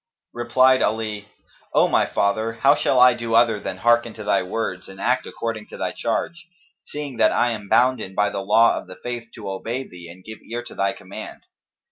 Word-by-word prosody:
Replied 130 +2 +3
Ali, 105 -1 -2 0.5
"O - - +5
my - - +2
father, 110 +3 0
how 135 +5 +4
shall 130 - +1
I 125 0 +7
do 115 -1 -2
other 115 -2 +4
than 95 - -5
hearken 120 +2 +2
to - - -8
thy 105 - +2
words 90 -1 -4
and 95 0 -12
act 125 +3 0
according 110 -2 -5
to - - -10
thy - - -2
charge, 170 0 -3 0.4
seeing 145 -4 -7
that - - +4
I 120 0 +2
am 105 -3 -6
bounden 120 -6 +2
by 105 0 +1
the 100 - -3
law 110 +4 +4
of - - -13
the 95 - -10
Faith 120 -1 -5
to 105 - -8
obey 115 +7 -4
thee 85 -1 -12
and 90 +2 -13
give 110 +2 -10
ear 120 +2 -6
to - - -11
thy 100 0 0
command?" - - -10
115 Hz, 205 wpm, -22 LUFS, 100-120 Hz, 0.5 s, I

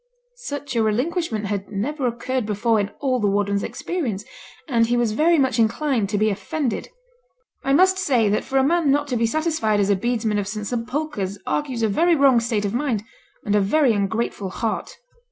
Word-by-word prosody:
Such 285 -2 -5
a 230 - +3
relinquishment 235 - -1
had 200 -1 -3
never 255 +7 -2
occurred 240 0 -2
before 220 +2 +1
in 200 0 -1
all 260 -3 +1
the 210 - +1
warden's 200 0 +1
experience; 235 - -3 0.4
and 230 -5 +2
he 240 +1 +1
was 240 -2 +1
very 325 +9 +3
much 265 -4 +1
inclined 230 -1 +1
to 205 - 0
be 215 +1 +2
offended. 260 - -3 0.7
'I 270 - +1
must 375 +5 +4
say 255 - +2
that 205 +1 +1
for 270 - -2
a 265 - +4
man 330 +1 +2
not 290 +1 +2
to 250 - -1
be 230 -1 +2
satisfied 310 -7 0
as 200 0 +2
a - - +4
bedesman 225 0 0
of 200 - -3
St 210 0 -4
Sepulchre's 240 -3 -3
argues 260 -6 -2
a - - +4
very 335 - +3
wrong 275 -4 +5
state 225 -3 -1
of 200 - -2
mind, 240 -5 -1 0.4
and 205 -1 +1
a 205 - +4
very 255 +5 +3
ungrateful 205 -1 -2
heart.' 220 +3 -3
235 Hz, 195 wpm, -22 LUFS, 210-280 Hz, 0.7 s, wrong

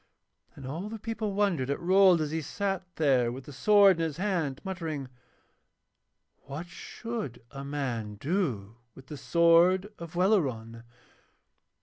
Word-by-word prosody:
And 135 - -10
all 165 +10 -5
the 225 - -6
people 220 -1 -4
wondered 180 -11 +1
at 140 - -1
Rold 185 -1 +5
as 150 -1 -2
he 160 0 -2
sat 195 +4 -3
there 130 -6 +2
with 130 +2 -7
the 145 - -11
sword 200 +5 +5
in 165 - -1
his 160 -2 -3
hand 175 -8 -1
muttering, 165 -8 -4 1.4
'What 145 +5 -6
should 175 - -7
a 135 -1 -7
man 125 -7 -3
do 120 - -2 0.2
with 135 - -14
the 150 +2 -8
sword 170 +6 +4
of 170 0 -9
Welleran?' 135 - 0
165 Hz, 140 wpm, -28 LUFS, 135-190 Hz, 1.4 s, Rold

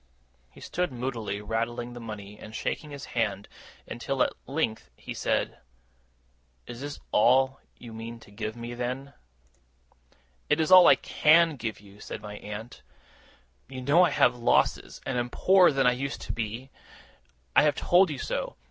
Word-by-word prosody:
He - - -17
stood 180 -3 -2
moodily 120 -5 -4
rattling 120 +2 -3
the 120 - -8
money, 105 -2 -8
and 110 +1 -10
shaking 150 - -3
his 140 -1 -8
head, 100 -4 -1 0.4
until 130 +2 -1
at - - -1
length 135 - -2
he - - -8
said: - - -1 1.1
'Is 120 +1 -9
this 145 +1 -6
all 130 +4 +4 0.2
you 115 -2 -11
mean 115 +1 -7
to 105 - -16
give 110 +1 -5
me, 120 0 -7
then?' 125 +3 -4 1.4
'It 150 - +3
is 160 +2 +1
all 185 -1 +10
I - - +8
CAN 165 +1 +4
give 115 -4 -5
you,' 100 0 -17
said - - -7
my 105 0 -7
aunt. 105 +3 -8 0.9
'You 130 -1 -7
know 150 +7 +5
I - - +4
have 125 - +3
had 120 - -13
losses, - - +1
and 125 -2 -1
am 120 0 -2
poorer 185 +5 +5
than 135 -1 +1
I 125 - +6
used 135 +3 -4
to - - -5
be. 115 +4 -5 0.8
I - - +8
have 150 -2 +3
told 180 +5 +4
you 150 - -4
so. - - -3
120 Hz, 170 wpm, -27 LUFS, 110-140 Hz, 1.4 s, all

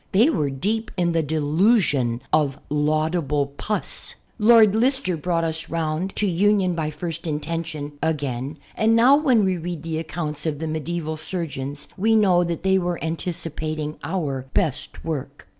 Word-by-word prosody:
They 230 +11 +5
were 150 - 0
deep 210 +12 -2
in 175 -1 +2
the 165 -1 +2
delusion 150 - +2
of 145 -3 +2
laudable 150 -1 0
pus. 210 +7 -2 0.2
Lord 220 -1 +7
Lister 250 -3 +2
brought 165 +1 -1
us 160 0 -2
round 165 +3 -2
to 210 - +1
union 195 0 +2
by 160 -2 -2
first 165 +2 -5
intention 150 -1 -4
again 145 -3 -2 0.2
and 225 +1 +3
now 245 +5 +7
when 260 -8 +3
we 185 -1 +1
read 170 -2 -5
the 160 -1 -2
accounts 155 -1 -4
of 150 -2 -1
the 160 - -4
medieval 160 0 -3
surgeons 150 -4 -4
we 220 +4 +3
know 185 -5 +4
that 170 -1 -3
they 190 0 +3
were 175 -1 -1
anticipating 155 -2 -3
our 145 -6 -3
best 155 -6 -1
work. 145 -3 -5
165 Hz, 155 wpm, -23 LUFS, 150-185 Hz, 0.2 s, Lord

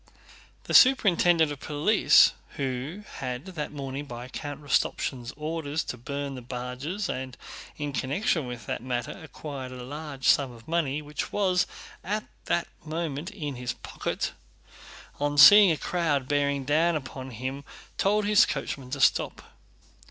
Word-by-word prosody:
The - - -5
superintendent 175 - +5
of 145 - -6
police, 155 +11 +4 0.2
who 135 +8 -3
had 125 +2 -4
gone 190 - -9
that 150 -3 -4
morning 140 0 -5
by 120 -1 -8
Count 145 +2 -6
Rostopchín's 130 -3 -1
orders 155 0 -2
to - - -5
burn 140 +3 -5
the 130 - -7
barges 125 - -4
and 130 -3 -5
had - - -13
in 145 -1 -3
connection 150 - 0
with 120 -4 -7
that - - -3
matter 120 -1 -3
acquired 140 -3 -7
a 125 -1 -8
large 145 0 -5
sum 135 -3 +4
of 115 -1 -15
money 155 -3 0
which 150 0 -5
was 185 -3 +2 0.4
at 210 +4 -2 0.2
that 170 - 0 0.2
moment 160 0 -3
in 150 -10 -5
his 120 -1 -3
pocket, - - -4 0.9
on 145 0 -1
seeing 200 +8 +10
a 160 - 0
crowd 150 -7 0
bearing 140 -1 0
down 160 +4 +3
upon 130 -2 -6
him 130 +4 -5 0.4
told 210 +1 +2
his 210 0 +5
coachman 135 -2 -4
to 140 +2 -4
stop. - - +2
145 Hz, 150 wpm, -27 LUFS, 130-165 Hz, 0.9 s, seeing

